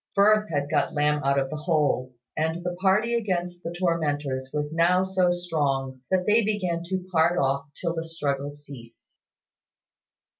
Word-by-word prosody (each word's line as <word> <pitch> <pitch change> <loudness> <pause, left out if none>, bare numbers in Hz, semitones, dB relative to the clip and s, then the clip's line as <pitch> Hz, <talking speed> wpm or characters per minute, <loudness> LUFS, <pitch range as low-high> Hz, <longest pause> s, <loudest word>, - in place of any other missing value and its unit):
Firth 210 +1 +4
had 145 -3 -1
got 150 0 0
Lamb 150 0 +2
out 140 0 +2
of 135 -1 0
the - - -3
hole, 150 -5 0 0.2
and 160 +2 -1
the 180 0 -3
party 210 +5 +3
against 180 -6 -1
the 165 - -5
tormentors 145 -7 -1
was 150 0 -3
now 175 +3 +3
so 190 -2 +2
strong 140 -7 -1
that 185 -1 +1
they 220 +2 +4
began 185 -5 -1
to 185 +1 -3
part 170 +1 +3
off 140 -2 +1
till 170 -2 -1
the 165 -1 -3
struggle 145 -4 -2
ceased. 140 -5 -13
165 Hz, 160 wpm, -26 LUFS, 145-180 Hz, 0.2 s, Firth